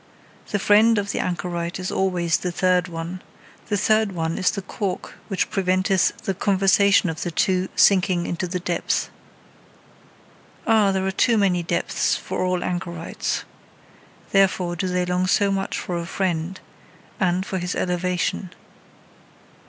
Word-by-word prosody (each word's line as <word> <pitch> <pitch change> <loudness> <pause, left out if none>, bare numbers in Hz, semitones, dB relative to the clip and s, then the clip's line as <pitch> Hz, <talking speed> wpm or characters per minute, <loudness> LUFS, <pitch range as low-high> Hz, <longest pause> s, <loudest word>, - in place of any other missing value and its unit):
The 205 - 0
friend 215 +3 +5
of 200 0 -1
the - - -3
anchorite 175 0 -3
is 185 - -3
always 175 -4 +1
the 180 - -3
third 180 0 +2
one: 170 +2 -6 0.5
the 205 - 0
third 215 0 +2
one 165 -1 -2
is 185 - +3
the 195 - -4
cork 195 -1 -4
which 195 - -1
preventeth 185 -1 +1
the 195 - -1
conversation 195 0 +3
of 160 -2 -4
the 175 - -2
two 185 +2 +1
sinking 185 -3 +4
into 175 +1 -3
the 180 +1 -3
depth. 175 0 -1 1.5
Ah! 220 -4 +4
there 190 0 -1
are 190 - 0
too 230 +4 +2
many 190 -4 +2
depths 170 - 0
for - - -3
all 180 -1 0
anchorites. 175 -2 -3 0.9
Therefore, 185 -3 +2
do 185 +2 -2
they 180 0 0
long 180 +1 0
so 200 +1 +3
much 195 0 -2
for 175 -1 -3
a 170 - -5
friend, 180 -1 -2 0.6
and 185 0 +1
for 190 - -3
his 180 +1 -3
elevation. 180 +1 -1
185 Hz, 150 wpm, -23 LUFS, 175-195 Hz, 1.5 s, friend